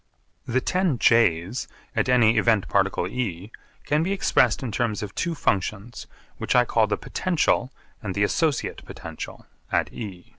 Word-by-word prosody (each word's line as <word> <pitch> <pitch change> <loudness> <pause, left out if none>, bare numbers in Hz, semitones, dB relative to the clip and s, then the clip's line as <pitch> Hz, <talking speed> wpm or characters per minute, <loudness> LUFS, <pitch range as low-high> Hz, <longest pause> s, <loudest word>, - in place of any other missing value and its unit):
The 130 +2 +1
ten 180 -5 +1
J's 115 -2 +2 0.3
at - - +1
any 120 -3 +5
event 110 -4 +2
particle 95 -2 +1
E 100 -3 -4 0.3
can 150 +1 +2
be 180 +4 -1
expressed 195 -6 +2
in 125 - -3
terms 110 -2 -1
of 105 -1 -6
two 170 -2 -2
functions 105 - -2 0.3
which - - -1
I 125 0 +5
call 115 -2 +2
the 105 - -1
potential 155 -7 0 0.3
and 95 -4 -4
the 100 - +2
'associate 150 +7 0
potential' - - -8 0.3
at - - 0
E. 95 -6 -7
115 Hz, 155 wpm, -24 LUFS, 100-130 Hz, 0.3 s, any